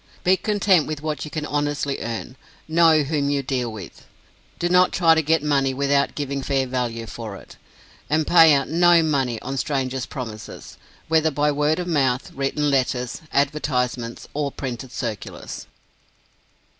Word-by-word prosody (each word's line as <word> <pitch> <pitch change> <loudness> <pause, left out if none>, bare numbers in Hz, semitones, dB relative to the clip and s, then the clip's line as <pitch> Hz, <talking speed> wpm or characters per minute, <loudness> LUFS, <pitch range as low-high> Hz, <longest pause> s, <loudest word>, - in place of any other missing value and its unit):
Be 185 +1 +4
content 190 -3 +2
with 155 -1 -5
what 155 -2 -3
you - - -7
can 150 0 -4
honestly 145 -2 -1
earn. 115 +2 -5 0.3
Know 160 -1 +4
whom 145 -1 -1
you 140 -1 0
deal 125 -3 -2
with. 100 -6 -10 0.5
Do 175 - 0
not 180 +1 +4
try 165 -2 +5
to 160 - +2
get 160 0 +1
money 135 -3 +1
without 140 +1 +1
giving 140 -1 -3
fair 135 0 0
value 120 -3 -3
for 110 -2 -7
it. - - -13 0.5
And 155 +1 +2
pay 165 -1 +7
out 140 - 0
no 170 0 +4
money 135 -7 0
on 135 +2 -4
strangers' 130 -2 -2
promises, 115 -6 -8 0.3
whether 160 0 +3
by 150 0 +1
word 150 +2 +1
of 180 - -3
mouth, 135 -7 0
written 140 +2 -1
letters, 125 -2 -1
advertisements, 125 -5 -1
or 145 -1 -2
printed 130 -2 -6
circulars. 120 -5 -6
140 Hz, 155 wpm, -22 LUFS, 130-155 Hz, 0.5 s, pay